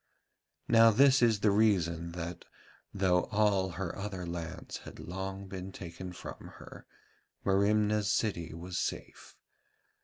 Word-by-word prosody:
Now 115 -1 +7
this 135 +4 +5
is 110 -4 +3
the 105 - +4
reason 85 -6 +2
that, 85 0 -6 0.5
though 95 -2 +2
all 100 -3 +2
her 95 -3 -3
other 100 -3 -5
lands 85 +1 -6
had - - -11
long 95 +2 -5
been 95 0 -7
taken 90 0 -8
from 90 - -9
her, - - -12 0.6
Merimna's 105 +1 +2
city 85 -8 -1
was 90 +3 -5
safe. - - -5
95 Hz, 125 wpm, -31 LUFS, 90-105 Hz, 0.6 s, Now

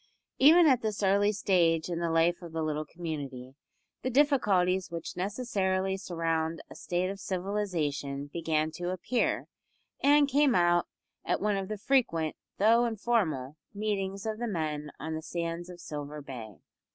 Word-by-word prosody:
Even 325 +6 +8
at 260 -5 +4
this 215 -2 -2
early 200 +2 +4
stage 175 -6 +2
in 170 -2 -3
the 170 -1 0
life 165 +2 +2
of 170 -2 -9
the 160 -1 -1
little 155 0 -2
community 140 -7 -6 0.5
the 255 - -1
difficulties 205 - +3
which 170 -1 -6
necessarily 190 -2 -1
surround 165 -3 -2
a - - -9
state 180 +2 -1
of 195 - -8
civilisation 175 -8 -2
began 160 -2 0
to 175 +2 -4
appear, 185 +7 0 0.6
and 290 0 +5
came 280 -1 +3
out 175 -1 +3 0.4
at - - 0
one 210 0 +1
of 195 -1 -2
the 215 +1 -4
frequent, 195 - +1 0.2
though 230 +4 +5
informal, 195 - -1 0.2
meetings 200 -1 -2
of 220 0 -3
the 240 - -2
men 155 -6 -2
on 160 +2 -4
the 160 - -3
sands 170 +1 -4
of 175 -1 -10
Silver 150 -2 -6
Bay. 120 -7 -8
180 Hz, 155 wpm, -29 LUFS, 160-210 Hz, 0.6 s, Even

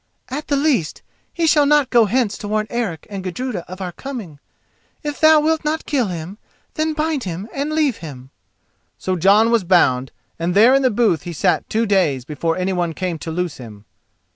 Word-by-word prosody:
"At 290 +4 -5
the 285 - +1
least, 275 - 0 0.3
he 335 - -1
shall 295 -2 +4
not 295 -3 +3
go 235 -2 +5
hence 225 0 0
to 210 - -6
warn 215 +1 0
Eric 220 -10 -3
and 195 -3 -6
Gudruda 195 +1 -4
of 185 +1 -8
our 180 -1 -4
coming. 210 - -8 0.6
If 295 -1 -4
thou 315 0 +7
wilt 315 +1 +1
not 310 +1 -2
kill 265 -7 0
him, 180 +3 -6 0.3
then 310 0 -1
bind 305 -4 -1
him 180 +3 -5
and 280 +2 -2
leave 305 -6 +1
him." 135 -5 -10 0.7
So 185 - -2
Jon 200 +6 +4
was 230 -4 +3
bound, 135 -8 +2 0.3
and 170 +2 -1
there 225 +5 +6
in 275 - +4
the 260 - +3
booth 210 -8 +1
he 175 - -7
sat 150 - 0
two 225 +1 +1
days 170 - +1
before 165 +3 -2
anyone 180 -2 -1
came 180 -3 -3
to 165 - -6
loose 175 0 -3
him. 110 -4 -12
205 Hz, 195 wpm, -20 LUFS, 170-275 Hz, 0.7 s, thou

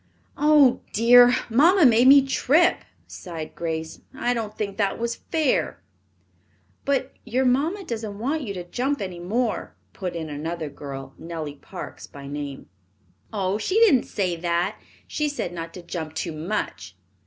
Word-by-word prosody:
"Oh, 295 -4 +5
dear, 245 +2 +7 0.2
mamma 315 - +5
made 240 0 +6
me 275 0 +8
trip," 300 +5 +3 0.3
sighed 165 -3 -8
Grace. 160 -1 -4 0.2
"I 245 -1 0
don't 220 -3 -4
think 200 -2 -3
that 200 -3 0
was 235 0 -2
fair." 315 -5 +1 1.1
"But 275 -1 0
your 260 +2 0
mamma 305 +11 +1
doesn't 220 - -5
want 280 +8 -1
you 225 -7 -4
to 180 - -5
jump 260 +10 -2
any 185 -3 -5
more," 220 +7 -2 0.2
put 180 -3 -5
in 160 -2 -4
another 155 +1 -4
girl, 135 -1 -8
Nellie 160 -3 -5
Parks - - -9
by 140 -1 -11
name. 140 -1 -6 0.6
"Oh, 200 -1 -1
she 370 - -2
didn't 385 - +5
say 185 -4 -1
that. 175 +4 -1 0.3
She 300 -1 -1
said 285 -11 -4
not 165 -1 -6
to 180 - -9
jump 160 -2 -6
too 170 - -3
much." 160 +7 -4
210 Hz, 155 wpm, -24 LUFS, 170-260 Hz, 1.1 s, me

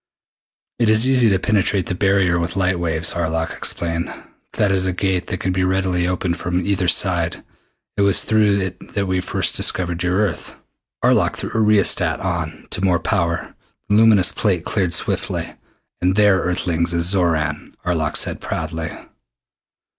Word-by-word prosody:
"It 115 -3 +2
is 110 +3 +4
easy 125 -4 +4
to 95 - +2
penetrate 100 -1 +1
the - - -3
barrier 95 -2 +2
with 85 +1 -3
light 95 -2 0
waves," 80 -1 0
Arlok 80 -1 -2
explained. 85 0 -3 0.4
"That 100 -2 +1
is 95 -1 +1
a 90 - -1
Gate 95 0 -1
that 90 - -4
can 95 - -1
readily 95 -1 0
be 90 - 0
opened 90 -1 -2
from 90 0 -2
either 95 -3 0
side. 85 -1 +1 0.5
It - - +1
was 100 -1 +4
through 105 -2 +2
it 95 -1 -7
that 100 -1 0
we 95 -1 -1
first - - 0
discovered 90 -2 +1
your 90 0 0
Earth." 105 -4 -2 0.5
Arlok - - +2
threw - - -5
a 110 - +1
rheostat 100 -6 +3
on 85 -5 -4
to 95 - -3
more 90 -2 +3
power. 85 -7 -2 0.4
The 105 - +3
luminous 110 -4 +5
plate 95 -6 -1
cleared 90 -5 0
swiftly. - - -3 0.5
"And 90 +1 +1
there, 105 -2 +4
Earthlings, 85 -1 -1
is 85 0 0
Xoran!" 85 -5 0
Arlok 80 -4 0
said - - -1
proudly. 80 0 -4
90 Hz, 165 wpm, -20 LUFS, 85-100 Hz, 0.5 s, luminous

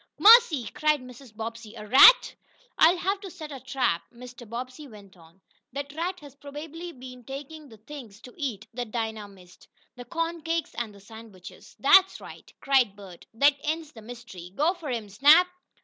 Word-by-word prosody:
"Mercy!" 425 - +6
cried 300 0 +1
Mrs. 255 -1 -14
Bobbsey. 225 0 -7
"A 210 -2 -9
rat!" 275 - +7 0.5
"I'll 340 +3 +6
have 385 +3 -2
to 390 - -8
set 320 -4 -10
a 275 - -7
trap," 250 -10 -1
Mr. 245 -1 -13
Bobbsey 255 +5 -7
went 205 -5 -15
on. 165 +1 -21 0.3
"That 280 +1 -6
rat 355 +4 -4
has 285 -3 -13
probably 295 +4 -9
been 250 -3 -12
taking 285 +3 -9
the 220 - -15
things 225 -3 -12
to 250 - -13
eat 260 - -5
that 245 -1 -5
Dinah 220 -2 -4
missed 185 -3 -19 0.3
the 245 -1 -10
corn 330 +2 -4
cakes 330 0 -3
and 225 -4 -5
the - - -15
sandwiches." 205 -2 -14
"That's 380 0 +5
right!" - - -13
cried 260 -7 +2
Bert. 195 -4 -14
"That 280 +5 +4
ends 315 0 -3
the 225 - -13
mystery. 220 -6 -11
Go 315 +5 +2
for 340 -6 -9
him, 230 -4 -4
Snap!" 290 - +5
255 Hz, 180 wpm, -26 LUFS, 220-310 Hz, 0.5 s, rat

